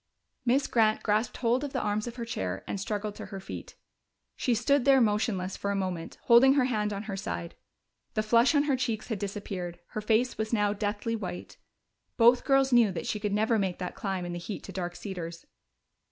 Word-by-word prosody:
Miss 265 +3 +3
Grant 220 -2 +2
grasped 215 +2 0
hold 245 +2 +1
of 285 - -4
the - - 0
arms 210 +2 -1
of 240 - -6
her 235 -2 -4
chair 95 - -3
and 200 - -4
struggled 210 +1 -3
to - - -7
her 195 - -7
feet. 190 - -8 0.6
She 245 - +1
stood 260 +4 +2
there 270 0 +6
motionless 210 -4 +1
for 200 - -3
a 200 - 0
moment, 185 -4 -3
holding 250 +3 +7
her 280 -2 +3
hand 210 -4 0
on 200 0 -4
her 215 -3 -4
side. 85 - -4 0.6
The 215 - +1
flush 235 +7 +4
on 290 - +5
her 290 -2 +2
cheeks 240 -4 -2
had 220 -4 -2
disappeared; 190 -3 -5
her 215 - -4
face 225 +3 +1
was 220 0 -2
now 205 -2 +2
deathly 210 +2 -2
white. 185 -5 -6 0.6
Both 240 +1 +5
girls 270 -1 +3
knew 235 -4 +6
that 180 - -5
she 210 - -2
could 210 -1 -2
never 220 +2 +2
make 190 -3 -1
that 180 - -4
climb 190 -3 -3
in 175 - -4
the 175 - -4
heat 195 +4 -6
to - - -8
Dark 175 -1 -4
Cedars. 170 -4 -6
215 Hz, 210 wpm, -29 LUFS, 195-235 Hz, 0.6 s, holding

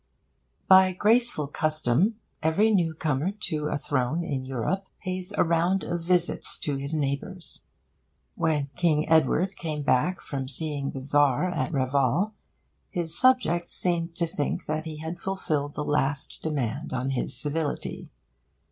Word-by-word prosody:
By 190 -1 +7
graceful 220 -4 +2
custom, 155 - +1 0.3
every 200 +8 +3
newcomer 160 -2 0
to 150 -5 -1
a 150 - -1
throne 145 +3 -1
in 140 -5 -3
Europe 135 +10 -2 0.2
pays 185 0 -4
a - - +5
round 170 +3 +1
of 175 0 -3
visits 175 0 +1
to 145 -2 -1
his 140 +1 -3
neighbours. 155 +4 -3 0.7
When 155 - 0
King 160 -4 +2
Edward 160 +4 +3
came 155 -3 -4
back 160 +7 +2
from 135 -5 -5
seeing 145 0 -2
the 135 - -6
Tsar 145 +4 +2
at 130 -7 -2
Reval, 140 - +1 0.6
his 170 -2 -2
subjects 250 -10 +3
seemed 170 -2 +1
to 170 - +1
think 155 -3 -2
that 155 +1 -2
he 155 -1 -6
had 160 +3 -6
fulfilled 155 -7 -2
the 150 - -3
last 145 -1 -1
demand 145 -2 -2
on 130 +1 -1
his 125 -2 +1
civility. 150 +2 -1
155 Hz, 140 wpm, -26 LUFS, 140-180 Hz, 0.7 s, By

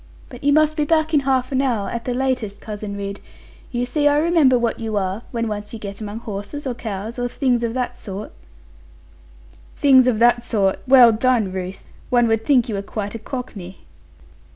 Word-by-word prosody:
But 245 0 -11
you 285 - +3
must 310 +1 +3
be 300 - +2
back 315 +1 +1
in 295 - +5
half 265 -2 0
an 265 0 +1
hour, 235 -7 0
at 235 0 -5
the 245 - -2
latest, 250 -6 -1
Cousin 210 -1 -6
Ridd. 200 0 -5 0.5
You 245 -1 -1
see 290 +4 +1
I 290 0 +4
remember 305 -5 +4
what 235 -1 -1
you 220 -2 -3
are; 190 +2 -2
when 230 -1 -2
once 210 0 -5
you - - -5
get 200 -1 -7
among 215 +2 -6
horses, 215 +7 -6
or 260 - -1
cows, 220 0 -6
or 245 - 0
things 245 -1 0
of 230 0 -2
that 250 -1 -3
sort.' 200 0 -7 1.4
'Things 260 -3 +5
of 245 -4 +2
that 240 +1 +4
sort! 205 -5 0
Well 250 -3 +8
done, 225 -3 +1
Ruth! 185 0 -6 0.2
One 240 -1 +3
would 225 0 +1
think 255 -4 +3
you 225 - -3
were 200 - -2
quite 205 0 -5
a 230 - -6
Cockney.' 210 -8 -8
235 Hz, 200 wpm, -21 LUFS, 210-260 Hz, 1.4 s, Well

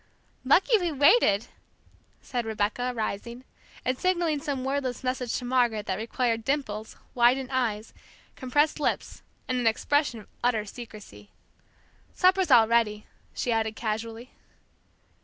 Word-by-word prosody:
"Lucky 375 - +4
we 350 -3 -1
waited!" 280 - +4 0.8
said 245 -2 -3
Rebecca, 225 +3 -1
rising, 235 +1 -4 0.4
and 255 0 0
signaling 345 -5 +1
some 275 -4 -3
wordless 265 -2 -2
message 255 -2 -2
to 250 - -6
Margaret 240 -4 +1
that 190 +1 -2
required 230 0 -1
dimples, 220 -6 -3 0.2
widened 255 +2 +3
eyes, 230 -5 -1 0.4
compressed 290 +5 +1
lips, 295 - -2 0.3
and 255 -1 0
an 240 - +1
expression 265 +2 +1
of - - -18 0.2
utter 230 -3 +1
secrecy. 210 - -11 0.9
"Supper's 370 -1 +3
all 235 -4 +7
ready," 220 -2 +1 0.3
she 245 - -1
added 220 -1 0
casually. 225 +2 -4
245 Hz, 125 wpm, -27 LUFS, 220-270 Hz, 0.9 s, all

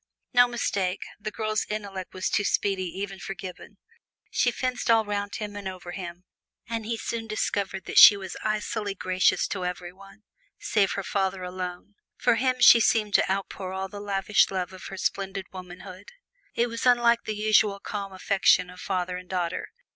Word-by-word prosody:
No 245 0 +7
mistake, 200 -6 -1 0.2
the 215 - -4
girl's 215 0 -1
intellect 200 -3 -5
was 185 - -1
too 205 - +1
speedy 195 -2 0
even 195 +2 -5
for 195 +2 -6
Gibbon. 185 +2 -9 0.5
She 245 - +2
fenced 250 +1 -2
all 225 -1 +5
'round 205 0 -3
him 210 -1 -5
and 205 -1 -5
over 185 -2 -7
him, 175 -1 -7 0.4
and 225 -1 -4
he 230 0 -1
soon 225 0 -4
discovered 200 -3 -2
that - - +4
she 205 - +11
was 190 -2 -7
icily 215 -1 -2
gracious 185 0 +2
to 190 -3 -3
every 180 0 -4
one, 195 +3 -16 0.3
save 200 -3 +1
her 200 - -3
father 190 -2 -1
alone. 180 +2 -6 0.2
For 245 - +3
him 255 +1 +1
she 240 -1 +9
seemed 215 -2 +2
to - - +3
outpour 190 -1 -3
all 190 0 -4
the 205 0 -8
lavish 200 0 +2
love 185 -1 -3
of 185 - -11
her 195 - -8
splendid 195 0 -2
womanhood. 185 +1 -10 0.5
It 235 - +3
was 230 +1 -2
unlike 235 -1 +4
the 215 - -3
usual 210 -1 +3
calm 200 -1 -5
affection 185 -1 +2
of 180 - -13
father 180 -1 -2
and 180 0 -11
daughter. 175 -3 -2
195 Hz, 180 wpm, -26 LUFS, 185-215 Hz, 0.5 s, she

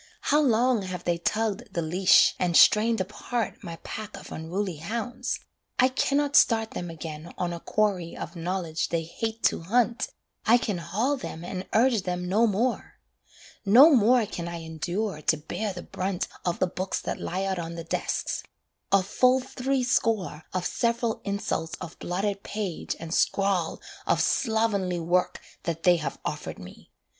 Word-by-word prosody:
How 300 - +6
long 245 -3 +3
have 185 -2 -5
they 170 -1 0
tugged 220 +5 -1
the 170 - 0
leash, 180 +4 +5
and 175 -2 +3
strained 225 +2 +6
apart 210 +3 -3
My 170 - -6
pack 215 -1 -6
of - - -11
unruly 175 +2 -3
hounds: 225 +10 -3 0.4
I 255 - +5
cannot 280 +2 +1
start 225 -1 +5
Them 175 - -5
again 160 0 -7
on 175 -1 -1
a 170 - -5
quarry 190 -4 0
of - - -6
knowledge 170 -1 -2
they 165 -1 0
hate 225 +7 -4
to - - +2
hunt, 235 +6 +1 0.4
I 235 - +6
can 210 -6 -2
haul 220 - 0
them 170 -9 -7
and 185 +1 -5
urge 235 -1 +4
them 180 -1 -3
no 215 +6 +3
more. 230 +5 -1 0.7
No 245 +10 +8
more 240 -1 +5
can 175 -4 -5
I 170 -1 -5
endure 165 +3 -3
to 160 - +2
bear 200 +8 -3
the 180 -2 -7
brunt 185 -1 -3 0.2
Of 175 -1 0
the - - +2
books 185 +1 -3
that - - -4
lie 185 +2 -2
out 190 -2 -1
on 170 0 -5
the 165 - -5
desks: 165 - -2 0.5
a 195 -1 +5
full 250 +6 +3
three 260 0 -1
score 215 -10 0
Of 185 -1 -2
several 235 -1 0
insults 200 -5 -2
of 175 -2 -9
blotted 195 +3 -2
page 205 -6 -4
and 165 0 -5
scrawl 195 -4 +1 0.3
Of - - +3
slovenly 215 -6 +1
work 175 +2 +1 0.3
that 165 -2 -3
they 180 -1 +6
have 155 - -4
offered - - -4
me. - - -12
195 Hz, 170 wpm, -27 LUFS, 170-225 Hz, 0.7 s, No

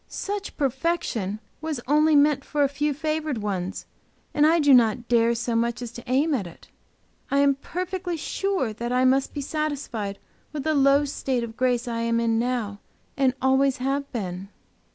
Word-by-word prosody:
"Such 400 0 -5
perfection 265 - -1 0.2
was 310 -4 -3
only 305 +2 +4
meant 285 -1 +4
for 295 -1 0
a - - +4
few 295 +2 -1
favored 305 -1 -2
ones, 195 -3 -3 0.5
and 295 +1 +4
I 330 +2 +4
do 290 -3 +5
not 235 -1 +4
dare 235 -1 +3
so 235 0 -2
much 235 +1 0
as 240 -2 -6
to 240 0 -10
aim 285 +5 +2
at 210 -10 -1
it. 170 - -15 0.6
I 275 - +1
am 280 0 +5
perfectly 360 +4 -4
sure 365 - -1
that 235 +2 -4
I 255 +1 +3
must 265 +1 +3
be 290 - -4
satisfied 275 -9 -3 0.4
with 295 -3 -4
the 315 - +1
low 280 0 +4
state 265 -3 -2
of 225 -1 -7
grace 250 -1 +1
I 230 -1 -2
am 230 0 +1
in 225 -1 +1
now 235 -4 -2 0.4
and 265 -2 +2
always 265 0 +3
have 275 +2 -2
been." 190 -4 -5
265 Hz, 180 wpm, -25 LUFS, 235-295 Hz, 0.6 s, do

